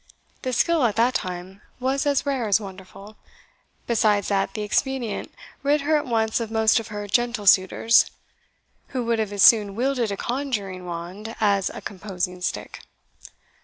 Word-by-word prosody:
The 255 - -2
skill, 325 +4 +2
at 220 -3 +2
that 240 +3 +3
time, 185 -2 -5 0.2
was 270 +3 0
as 285 0 +1
rare 270 -5 -1
as 205 +1 +3
wonderful; 195 +1 -11 0.7
besides 210 -3 +2
that 195 -1 0
the 215 - -3
expedient 240 +1 -2 0.3
rid 290 +1 +2
her 305 +2 +2
at 295 - 0
once 225 -2 +1
of 230 -2 -4
most 220 +1 +3
of 225 - -7
her 205 -1 -6
gentle 240 0 0
suitors, 195 +4 +5 0.9
who 245 - -1
would 230 -1 0
have 215 -2 -1
as 200 -1 +1
soon 205 -4 +6
wielded 245 -2 0
a 200 - -3
conjuring 210 -9 -3
wand 180 +6 -6
as 200 -3 +2
a - - -8
composing 180 -2 -5
stick. - - -4
220 Hz, 165 wpm, -24 LUFS, 195-245 Hz, 0.9 s, soon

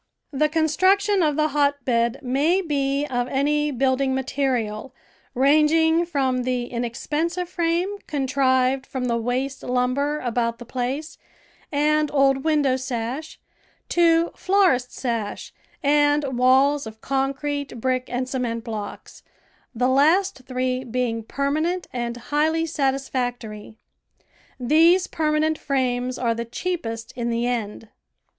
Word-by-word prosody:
The 305 +2 +2
construction 375 +6 +2
of 300 -3 +2
the 305 0 +1
hotbed 275 -4 +1
may 285 +8 +2
be 280 -2 0
of 245 -3 -2
any 295 +3 +1
building 265 0 +1
material, 260 -3 -2 0.4
ranging 315 +5 +4
from 265 -5 0
the 250 -1 -1
inexpensive 295 +9 -3
frame 350 +3 -1
contrived 265 -2 +1
from 260 -2 -3
the 235 -1 0
waste 255 +4 -2
lumber 255 +4 0
about 235 -1 -1
the 240 - -10
place 260 +6 -4 0.5
and 300 +1 +2
old 270 -1 +3
window^ 290 -5 +2
sash 260 +4 -4 0.5
to 335 -1 +3
florist's 365 -11 +1
sash 230 -5 -3 0.3
and 290 -1 +2
walls 265 +2 +3
of 220 0 -10
concrete, 275 0 -2
brick, 255 +1 0
and 250 +1 -2
cement 245 -3 -3
blocks, 215 -4 -7 0.5
the 250 +2 +1
last 300 +5 +3
three 255 0 -1
being 240 -2 -2
permanent 310 +9 -1
and 240 -1 -3 0.2
highly 315 +2 +2
satisfactory. 255 -7 -3 0.8
These 325 +8 +4
permanent 310 0 0
frames 255 -2 -1
are 235 -2 +1
the 230 +1 -3
cheapest 230 -5 -4
in 235 -1 -2
the 235 0 0
end. 225 -3 -3
270 Hz, 120 wpm, -23 LUFS, 245-305 Hz, 0.8 s, ranging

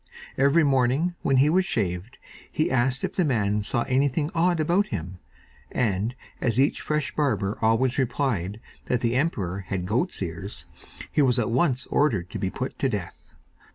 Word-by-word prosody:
Every 140 +5 +4
morning, 135 +5 +2
when 135 - +2
he 140 +3 +5
was 185 +3 +4
shaved, 100 - -2 0.3
he 155 - 0
asked 130 0 +1
if - - -2
the 185 - +1
man 105 -7 +1
saw 115 +3 0
anything 140 +3 +1
odd 170 0 +2
about 175 +6 +2
him, 90 -1 -5 0.5
and 110 0 0 0.3
as 120 -1 +1
each 140 +2 +2
fresh 150 -1 -1
barber 110 -9 0
always 120 +4 +2
replied 115 -6 -1 0.3
that 125 -1 0
the 115 -1 +1
emperor 110 - -1
had 95 -1 -4
goat's 120 - 0
ears, 85 -1 -6 0.5
he - - +2
was 130 -3 +3
at 115 -1 0
once 130 0 +1
ordered 105 - +1
to - - -5
be - - -1
put - - -5
to - - +1
death. - - -6
125 Hz, 170 wpm, -25 LUFS, 105-145 Hz, 0.5 s, he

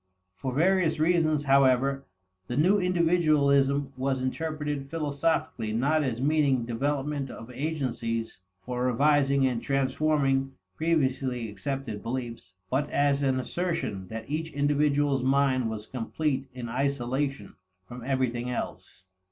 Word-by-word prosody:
For 95 +8 -4
various 165 +3 +2
reasons, 155 -2 +2
however, 135 0 +3 0.4
the 120 - -3
new 185 +7 +4
individualism 150 -6 +2
was 130 0 -1
interpreted 150 +1 -3
philosophically 145 -7 -1
not 145 +7 +2
as 125 -4 -2
meaning 140 -3 +2
development 140 +3 -2
of 115 +1 -9
agencies 125 - -3 0.2
for 125 +2 -3
revising 140 +1 +3
and 125 -3 0
transforming 135 -1 +1 0.2
previously 130 -7 0
accepted 115 0 -4
beliefs, 115 -6 -5 0.2
but 140 +3 0
as 140 0 +2
an 135 -2 +1
assertion 130 - -3
that 110 +2 -7
each 160 +3 -3
individual's 145 -1 +2
mind 130 -2 +2
was 110 -1 -5
complete 135 +3 -2
in 125 -2 -6
isolation 135 +2 -2 0.3
from 120 +2 -9
everything 125 -2 -1
else. 120 -5 -6
135 Hz, 120 wpm, -27 LUFS, 125-150 Hz, 0.4 s, new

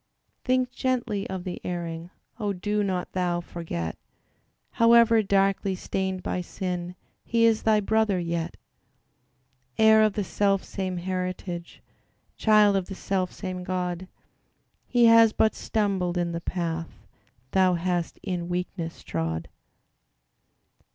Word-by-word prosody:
Think 255 0 +1
gently 245 -7 -1
of 190 -1 -4
the 180 -1 -5
erring: 170 -1 -4 0.3
Oh! 205 -2 -1
do 210 +3 -1
not 185 -2 -2
thou 180 -2 0
forget, 160 - -5 0.7
However 230 -1 +5
darkly 195 -1 +1
stained 190 0 -3
by 180 - -2
sin 180 0 -4 0.3
He 230 0 +2
is 225 -1 +3
thy 215 -1 +3
brother 220 -1 +2
yet; 170 -1 -3 1.2
Heir 220 0 +6
of 215 -1 +3
the 205 - -1
selfsame 195 -1 -1
heritage, 180 -1 -4 0.5
Child 210 -2 +5
of 190 - -2
the 195 - -6
selfsame 185 -1 -3
God, 180 0 -3 0.8
He 240 -1 +4
has 230 -1 +7
but 220 - +3
stumbled 190 -5 -1
in 175 -1 0
the 170 0 -4
path 165 -2 -4 0.5
Thou 185 -1 +4
hast 175 0 -2
in 180 -3 -3
weakness 175 -1 -4
trod. 80 0 -3
185 Hz, 120 wpm, -26 LUFS, 175-210 Hz, 1.2 s, has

